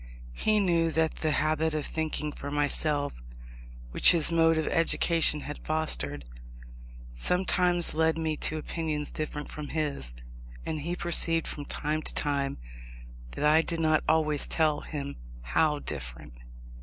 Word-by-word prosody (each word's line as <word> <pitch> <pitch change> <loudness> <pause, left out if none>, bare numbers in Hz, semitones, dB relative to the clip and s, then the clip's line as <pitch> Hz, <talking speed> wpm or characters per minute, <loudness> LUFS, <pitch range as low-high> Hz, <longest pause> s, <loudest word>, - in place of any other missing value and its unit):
He 215 - +1
knew 170 -4 +2
that 160 0 0
the 155 - 0
habit 155 +1 0
of 150 - -2
thinking 155 -1 -3
for 145 - -7
myself, 145 0 +1 0.8
which - - +7
his 165 -1 +2
mode 165 -1 +3
of 160 - 0
education 165 -2 +2
had 145 +1 -8
fostered, 75 - -1 0.9
sometimes 180 - +1
led 160 +1 +1
me 160 -1 -1
to 155 - 0
opinions 155 -1 -4
different 150 -1 -5
from 150 -1 -7
his, 140 - -3 0.5
and 155 -1 -3
he 170 +4 -3
perceived 165 -1 +3
from 145 - -5
time 150 +2 -3
to - - -5
time 140 -1 -1 0.8
that 150 - -2
I 155 +2 +5
did 165 0 -3
not 155 -1 +2
always 155 -2 +1
tell 155 -2 +1
him 140 -2 -6 0.3
how 150 - +1
different. 65 - -7
155 Hz, 145 wpm, -28 LUFS, 145-165 Hz, 0.9 s, which